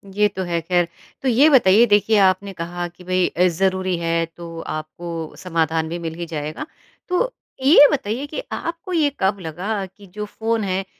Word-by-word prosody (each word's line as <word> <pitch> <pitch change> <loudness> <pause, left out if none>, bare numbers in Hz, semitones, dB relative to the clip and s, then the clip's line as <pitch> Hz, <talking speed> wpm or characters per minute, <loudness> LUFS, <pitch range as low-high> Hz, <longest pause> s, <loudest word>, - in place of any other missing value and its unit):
ये 210 0 +4
तो 190 -2 -5
है 170 -2 -1
ख़ैर। 175 +1 +1 0.3
तो 270 - -2
ये 260 +5 +5
बताइए 235 -5 +6
देखिए 210 0 +3
आपने 190 +1 +1
कहा 175 0 -4
कि 175 +1 -16
भई 185 0 +1
अ, 180 +2 +2
ज़रूरी 185 +1 0
है 165 0 0
तो 165 0 -10
आपको 160 +1 -6
समाधान 160 -2 -1
भी 170 - -4
मिल 165 -1 -4
ही 170 +1 -5
जाएगा। 155 - -5 0.4
तो, - - +1 0.3
ये 290 +1 +8
बताइए 255 -1 -2
कि 305 - -5
आपको 340 +3 -5
ये 310 -4 +3
कब 195 +1 +1
लगा 190 +5 -3
कि 200 +2 -16
जो 210 +3 -6
फ़ोन 225 +1 -2
है, 190 0 -1
185 Hz, 185 wpm, -21 LUFS, 170-215 Hz, 0.4 s, ये